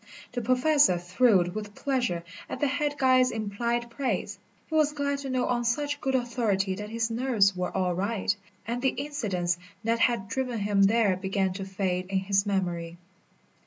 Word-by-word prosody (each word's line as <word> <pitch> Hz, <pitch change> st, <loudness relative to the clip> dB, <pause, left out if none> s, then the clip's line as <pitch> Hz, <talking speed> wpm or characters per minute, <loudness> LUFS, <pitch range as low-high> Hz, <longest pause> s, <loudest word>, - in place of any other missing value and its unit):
The 245 Hz, -, -3 dB
Professor 255 Hz, -, +4 dB
thrilled 180 Hz, 0 st, +3 dB
with 210 Hz, 0 st, -6 dB
pleasure 245 Hz, -11 st, -1 dB, 0.3 s
at -, -, -5 dB
the -, -, +2 dB
head 290 Hz, +1 st, -1 dB
guide's 255 Hz, -2 st, +4 dB
implied 235 Hz, +3 st, -2 dB
praise. 210 Hz, -6 st, -2 dB, 0.3 s
He -, -, -11 dB
was 305 Hz, -1 st, +3 dB
glad 280 Hz, -1 st, -1 dB
to 275 Hz, -1 st, -5 dB
know 255 Hz, -1 st, 0 dB
on 240 Hz, -1 st, 0 dB
such 290 Hz, +5 st, -1 dB
good 265 Hz, -1 st, 0 dB
authority 225 Hz, -6 st, 0 dB
that 210 Hz, +2 st, -6 dB
his 230 Hz, 0 st, -1 dB
nerves 225 Hz, -5 st, +2 dB
were 180 Hz, 0 st, -2 dB
all 180 Hz, -1 st, +1 dB
right, 200 Hz, +3 st, 0 dB, 0.3 s
and 240 Hz, +3 st, -3 dB
the 265 Hz, -, +1 dB
incidents 200 Hz, -, -1 dB, 0.2 s
that 230 Hz, +1 st, +1 dB
had 230 Hz, -5 st, +2 dB
driven 250 Hz, +2 st, -2 dB
him 205 Hz, -1 st, +1 dB
there 205 Hz, -1 st, +4 dB
began 190 Hz, 0 st, -1 dB
to 195 Hz, 0 st, -5 dB
fade 185 Hz, -2 st, -2 dB
in 195 Hz, -, 0 dB
his 195 Hz, +1 st, +1 dB
memory. 175 Hz, -4 st, -2 dB
225 Hz, 175 wpm, -27 LUFS, 190-255 Hz, 0.3 s, Professor